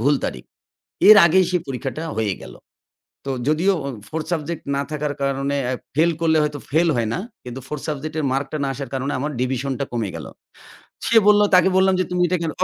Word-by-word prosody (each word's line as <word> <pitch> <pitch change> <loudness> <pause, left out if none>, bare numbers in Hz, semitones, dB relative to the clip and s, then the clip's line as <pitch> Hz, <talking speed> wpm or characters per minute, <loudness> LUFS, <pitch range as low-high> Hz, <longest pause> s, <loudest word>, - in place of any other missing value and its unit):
ভুল 140 +5 +3
তারিখ। 65 - -4 0.6
এর 215 - +11
আগেই 185 +3 +4
সেই 180 -1 +1
পরীক্ষাটা 135 +3 -4 0.2
হয়ে 105 -4 0
গেল। - - -10 0.7
তো 135 - -4 0.2
যদিও 170 +6 +2 0.3
4th 160 -1 -4
সাবজেক্ট 165 0 -3
না 140 - 0
থাকার 150 -1 -2
কারণে 140 +1 -1
আ - - -1 0.2
ফেইল 165 +2 +4
করলে 160 -1 +3
হয়তো 150 -1 -2
ফেইল 165 +4 +3
হয় 115 -2 0
না। - - -2 0.3
কিন্তু 125 +1 -7
4th 150 0 -6
সাবজেক্টের 155 +1 -3
মার্কটা 140 +3 -2
না - - -1
আসার 135 -1 -7
কারণে 135 +2 -2
আমার 145 +4 -2
ডিভিশন 130 +1 -1
টা - - +1
কমে 115 -5 -2
গেল। - - -7 0.8
সে 230 - +2
বলল, 210 0 +6
তাকে 180 +1 +6
বললাম 190 0 +4
যে, - - +2
"তুমি 180 0 -1
এটা 180 +1 0
কেনো" 160 -2 -2
150 Hz, 200 wpm, -21 LUFS, 135-170 Hz, 0.8 s, এর